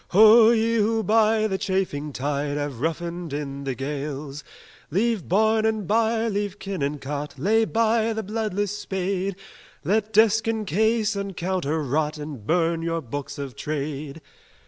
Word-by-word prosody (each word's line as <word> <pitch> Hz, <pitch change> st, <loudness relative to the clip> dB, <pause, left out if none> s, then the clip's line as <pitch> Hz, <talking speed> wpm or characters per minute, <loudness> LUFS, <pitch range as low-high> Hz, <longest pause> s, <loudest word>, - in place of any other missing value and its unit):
Ho, 220 Hz, +3 st, +7 dB
ye 230 Hz, 0 st, +2 dB
who 220 Hz, +1 st, +1 dB
by 220 Hz, +1 st, +3 dB
the 190 Hz, -3 st, -1 dB
chafing 180 Hz, -6 st, -1 dB
tide 145 Hz, +1 st, -2 dB
Have 145 Hz, -5 st, -4 dB
roughened 170 Hz, 0 st, -3 dB
in 140 Hz, -1 st, -4 dB
the 135 Hz, -2 st, -2 dB
gales! 145 Hz, +1 st, -5 dB, 0.5 s
Leave 210 Hz, +3 st, 0 dB
barn 220 Hz, +4 st, +3 dB
and 220 Hz, -2 st, 0 dB
byre, 225 Hz, +1 st, +2 dB
leave 205 Hz, -2 st, -2 dB
kin 195 Hz, -5 st, -5 dB
and 145 Hz, +1 st, -1 dB
cot, 145 Hz, +1 st, -5 dB
Lay 220 Hz, +10 st, +3 dB
by 225 Hz, 0 st, +2 dB
the 220 Hz, 0 st, -3 dB
bloodless 205 Hz, -1 st, -2 dB
spade: 190 Hz, -1 st, -2 dB, 0.5 s
Let 210 Hz, +6 st, 0 dB
desk 220 Hz, +1 st, +4 dB
and 220 Hz, -1 st, -1 dB
case 220 Hz, +3 st, +1 dB
and 200 Hz, -3 st, -4 dB
counter 170 Hz, -4 st, -1 dB
rot, 150 Hz, +3 st, -1 dB
And 145 Hz, -8 st, -8 dB
burn 165 Hz, 0 st, +1 dB
your 165 Hz, 0 st, -1 dB
books 140 Hz, +3 st, -6 dB
of 140 Hz, -3 st, -6 dB
trade!" 150 Hz, 0 st, -4 dB
185 Hz, 155 wpm, -24 LUFS, 150-220 Hz, 0.5 s, Ho